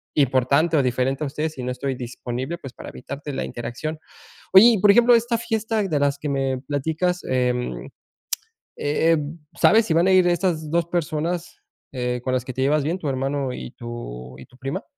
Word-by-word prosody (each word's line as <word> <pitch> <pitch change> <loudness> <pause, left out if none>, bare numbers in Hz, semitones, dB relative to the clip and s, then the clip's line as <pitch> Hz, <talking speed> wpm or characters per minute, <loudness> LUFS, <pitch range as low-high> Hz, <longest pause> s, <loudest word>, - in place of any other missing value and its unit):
importante 140 +4 +3
o 140 - +3
diferente 130 +3 0
a - - -2
ustedes 155 +2 -3
y 130 - -5
no 125 - -2
estoy 130 +1 -3
disponible, 125 +5 -5
pues, 135 -6 -10
para - - -9
evitarte 140 +3 -7
la - - -2
interacción. 125 +7 -5 0.5
Oye, 190 +3 +10
y 235 - +5
por 205 +1 +6
ejemplo, 240 +3 +6
esta 235 0 +1
fiesta 225 -1 -1
de 160 -7 0
las 140 0 +1
que 150 - -3
me 135 -2 0
platicas, 160 +6 -1
em, 125 - -1
eh - - -11 1.2
eh, 165 - +4 0.4
¿sabes 225 0 +5
si 160 - +1
van 170 +3 +4
a 190 - +5
ir 185 -1 +5
estas 170 -3 0
dos 170 0 +1
personas, 170 +1 -2 0.3
eh, 125 -1 -2
con 130 - -1
las 125 -2 -1
que 130 - -5
te 130 - -2
llevas 145 +1 +2
bien, 165 +5 -1
tu 155 - -4
hermano 135 0 -1
y 125 - -7
tu 65 - -8
y 65 - -11
tu 125 - -21
prima? 135 +9 -4
145 Hz, 200 wpm, -23 LUFS, 130-170 Hz, 1.2 s, Oye